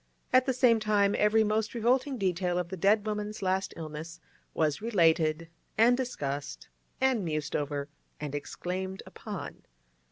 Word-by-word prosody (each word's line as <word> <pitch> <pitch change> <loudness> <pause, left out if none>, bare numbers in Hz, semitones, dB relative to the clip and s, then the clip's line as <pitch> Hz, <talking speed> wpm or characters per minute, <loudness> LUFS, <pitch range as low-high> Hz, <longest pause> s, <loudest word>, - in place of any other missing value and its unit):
At 255 +1 +5
the - - +3
same 245 -3 +4
time 205 -2 +2
every 215 +1 +4
most 215 +2 0
revolting 255 +4 +1
detail 180 -3 0
of 180 -1 -2
the 190 - -4
dead 205 +4 +3
woman's 210 -1 -3
last 190 +1 0
illness 160 +1 -7 0.4
was 155 0 +1
related 165 -6 +2 0.3
and 235 +3 +6
discussed 145 - -4 0.3
and 260 -5 +2
mused 155 -3 -2
over 145 -1 -2 0.3
and 150 -2 -5
exclaimed 185 +6 -4
upon. - - -7
190 Hz, 140 wpm, -29 LUFS, 160-220 Hz, 0.4 s, and